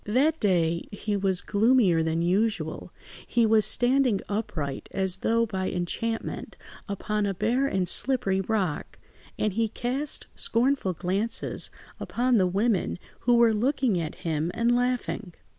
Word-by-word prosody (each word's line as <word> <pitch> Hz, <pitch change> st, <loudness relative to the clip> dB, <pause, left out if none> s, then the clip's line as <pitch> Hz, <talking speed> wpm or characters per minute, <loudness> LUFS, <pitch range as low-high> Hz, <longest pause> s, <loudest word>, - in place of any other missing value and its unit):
That 290 Hz, +9 st, +2 dB
day 170 Hz, -5 st, +1 dB
he 205 Hz, 0 st, -3 dB
was 190 Hz, -2 st, 0 dB
gloomier 210 Hz, -5 st, +3 dB
than 160 Hz, +1 st, 0 dB
usual; 185 Hz, -3 st, -1 dB, 0.4 s
he 235 Hz, -1 st, +2 dB
was 220 Hz, -1 st, +4 dB
standing 250 Hz, -4 st, +2 dB
upright, 160 Hz, -10 st, -4 dB
as 190 Hz, -1 st, +2 dB
though 230 Hz, +4 st, +1 dB
by 190 Hz, -4 st, -3 dB
enchantment, 225 Hz, +6 st, -4 dB, 0.3 s
upon 210 Hz, +1 st, -1 dB
a 195 Hz, -, -2 dB
bare 240 Hz, +8 st, +1 dB
and 190 Hz, -7 st, 0 dB
slippery 235 Hz, -7 st, +2 dB
rock, 190 Hz, -6 st, -2 dB, 0.4 s
and 215 Hz, -2 st, 0 dB
he 225 Hz, +2 st, +1 dB
cast 255 Hz, +6 st, -2 dB
scornful 240 Hz, -5 st, +2 dB
glances 195 Hz, +7 st, -1 dB, 0.3 s
upon 245 Hz, 0 st, +1 dB
the 185 Hz, -3 st, +3 dB
women 200 Hz, +1 st, 0 dB, 0.2 s
who 245 Hz, 0 st, +3 dB
were 235 Hz, -1 st, +5 dB
looking 245 Hz, -3 st, +1 dB
at 160 Hz, -1 st, -5 dB
him 160 Hz, 0 st, -1 dB
and 235 Hz, +1 st, +2 dB
laughing. 245 Hz, -6 st, -2 dB
210 Hz, 140 wpm, -26 LUFS, 185-240 Hz, 0.4 s, were